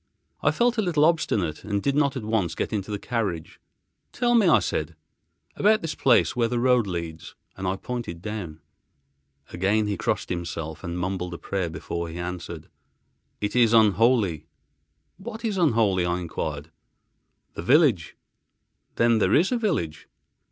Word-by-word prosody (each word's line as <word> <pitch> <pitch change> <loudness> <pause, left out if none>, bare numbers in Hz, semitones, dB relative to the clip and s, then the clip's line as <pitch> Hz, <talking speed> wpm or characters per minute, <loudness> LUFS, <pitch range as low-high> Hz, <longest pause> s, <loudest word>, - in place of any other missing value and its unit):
I - - +3
felt 240 -1 +1
a - - +4
little 165 -6 +2
obstinate 105 - 0
and 100 -1 -1
did 140 +7 0
not 140 -2 +2
at 125 - -5
once 105 -7 -1
get - - -3
into 100 -1 -3
the 105 - -2
carriage. 100 -8 -3 0.5
"Tell 240 -1 +1
me," 225 -5 +5
I 165 - +6
said, 80 +1 -2 0.6
"about 215 0 +3
this 160 -2 -2
place 130 -1 +3
where 120 -2 +2
the 120 +1 -2
road 125 -2 +3
leads," 85 -3 -6 0.2
and 95 -1 -4
I 95 - 0
pointed 115 -5 -5
down. 95 -6 -6 0.9
Again 100 +5 +1
he 105 -2 -2
crossed - - -2
himself 80 -2 -5
and 85 -1 -4
mumbled 90 -1 -3
a - - -7
prayer, 95 -2 -3
before 80 +2 -5
he 80 - -8
answered, 85 -2 -6 0.7
"It 105 +2 -2
is 120 -2 +4
unholy." 110 - +3 0.7
"What 220 +4 -7
is 215 -3 -1
unholy?" 110 - +3
I 90 +1 0
enquired. 80 -2 -5 0.8
"The - - -6
village." 125 - +3 0.8
"Then 115 -1 +3
there 95 -1 +3
is 175 - +3
a 250 - +2
village?" 110 - -2
105 Hz, 160 wpm, -25 LUFS, 85-130 Hz, 0.9 s, I